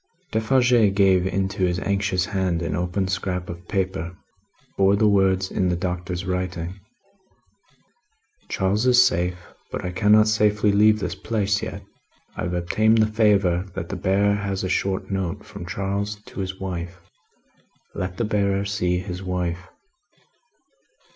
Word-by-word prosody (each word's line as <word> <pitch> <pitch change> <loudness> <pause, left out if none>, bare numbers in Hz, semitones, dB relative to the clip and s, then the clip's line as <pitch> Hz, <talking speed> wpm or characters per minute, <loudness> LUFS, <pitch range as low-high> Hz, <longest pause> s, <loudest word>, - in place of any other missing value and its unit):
Defarge 115 -2 +3
gave 95 -2 +4
into 95 +1 -1
his 90 -1 +1
anxious 100 -2 0
hand, 95 -4 -1
an 80 -3 -2
open 90 +3 -1
scrap 95 -2 -3
of 85 +1 -11
paper. 90 -3 -2 0.5
It - - -37
bore 100 +1 +4
the 105 +1 +3
words 95 -2 +2
in 95 -2 +1
the 90 - +1
Doctor's 90 0 -3
writing: 90 0 -3 1.7
"Charles 100 +5 0
is 125 -1 +6
safe, 90 -8 +3 0.3
but - - -4
I 90 - -2
cannot 105 +3 +4
safely 105 -1 +2
leave 105 +2 +5
this 105 - -3
place 100 -3 -1
yet. - - -6 0.5
I - - -3
have 90 0 -2
obtained 110 +6 +2
the 110 - +5
favour 100 -4 +3
that 85 - -5
the - - -3
bearer 100 +3 +2
has 100 -2 -3
a 95 - -2
short 95 +1 -1
note 95 +1 -3
from 100 -5 -9
Charles 100 +2 -2
to - - -10
his 95 0 -4
wife. 90 -1 -5 0.9
Let 90 0 -4
the 115 - 0
bearer 100 -2 0
see 90 -3 0
his 90 0 -5
wife." 90 -1 -3
95 Hz, 150 wpm, -23 LUFS, 90-105 Hz, 1.7 s, is